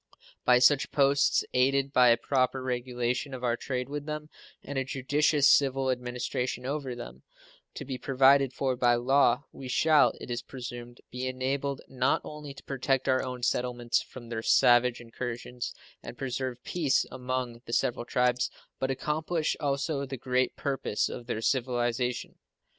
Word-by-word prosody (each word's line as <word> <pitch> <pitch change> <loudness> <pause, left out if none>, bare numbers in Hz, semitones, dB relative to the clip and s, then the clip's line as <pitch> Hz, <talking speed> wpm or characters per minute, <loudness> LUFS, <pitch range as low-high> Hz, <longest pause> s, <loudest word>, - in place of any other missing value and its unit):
By 125 -1 +6
such 135 +3 +4
posts, 140 -1 +3
aided 135 +2 +2
by 125 -1 +6
a 115 - +5
proper 130 0 0
regulation 125 +1 -2
of 125 - -9
our 120 -1 +2
trade 125 0 -3
with 145 +1 -5
them 150 0 -5 0.3
and 140 -1 -3
a - - 0
judicious 145 +2 +2
civil 135 -1 +4
administration 125 0 -3
over 135 -2 -3
them, 65 - -9 0.5
to - - -6
be 130 -1 -5
provided 135 0 +4
for 130 0 -1
by 120 -1 +3
law, 130 +1 +3
we 135 - -9
shall, 155 +4 +4
it - - -8
is 120 0 -2
presumed, 120 -2 -8
be 125 +1 -3
enabled 135 +2 -2
not 130 +1 +1
only 150 -1 -8
to - - -13
protect 135 -1 -1
our 130 0 +3
own 125 -1 -6
settlements 120 -1 0
from 120 -2 -11
their 115 -1 -3
savage 120 +1 +4
incursions 120 +1 -5 0.3
and 120 - -9
preserve 130 -1 -4
peace 150 -7 +1
among 125 -2 -4
the - - -8
several 120 0 +1
tribes, 125 0 +1 0.3
but 130 - -1
accomplish 155 +4 -1
also 140 0 -1
the 135 0 -5
great 125 +1 0
purpose 135 -7 -1
of 120 - -8
their 110 -2 -2
civilization. 125 0 -1
130 Hz, 160 wpm, -28 LUFS, 125-140 Hz, 0.5 s, By